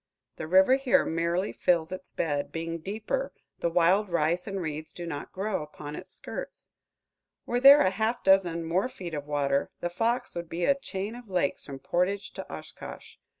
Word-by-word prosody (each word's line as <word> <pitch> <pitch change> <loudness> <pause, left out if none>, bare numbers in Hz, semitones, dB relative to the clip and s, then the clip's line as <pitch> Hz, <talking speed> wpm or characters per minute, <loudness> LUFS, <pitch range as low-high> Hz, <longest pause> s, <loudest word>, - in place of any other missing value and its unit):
The 155 - -5
river 190 +9 +6
here 275 0 +3
merely 170 +4 0
fills 170 -1 +1
its 185 0 -7
bed; 145 -3 -1
being 165 0 -4
deeper, 220 - -3 0.3
the 170 - +1
wild 180 +5 +3
rice 170 +2 +1
and 195 -1 -3
reeds 155 -2 -5
do 175 - -6
not 145 -4 -5
grow 195 0 -2
upon 150 0 -8
its 185 +3 -9
skirts. - - -8 0.8
Were 245 - 0
there 275 +3 +9
a 185 - +3
half 220 +5 -1
dozen 180 -4 +3
more 180 +8 +1
feet 175 -8 -8
of 145 -1 -4
water, 140 -1 +1
the 175 - -3
Fox 230 +7 0
would 170 -1 -5
be 170 +1 -1
a 280 - +5
chain 215 -6 -5
of 240 -3 -11
lakes 180 -7 0
from 140 - -6
Portage 185 +7 -1
to - - -8
Oshkosh. - - -9
180 Hz, 185 wpm, -28 LUFS, 165-210 Hz, 0.8 s, there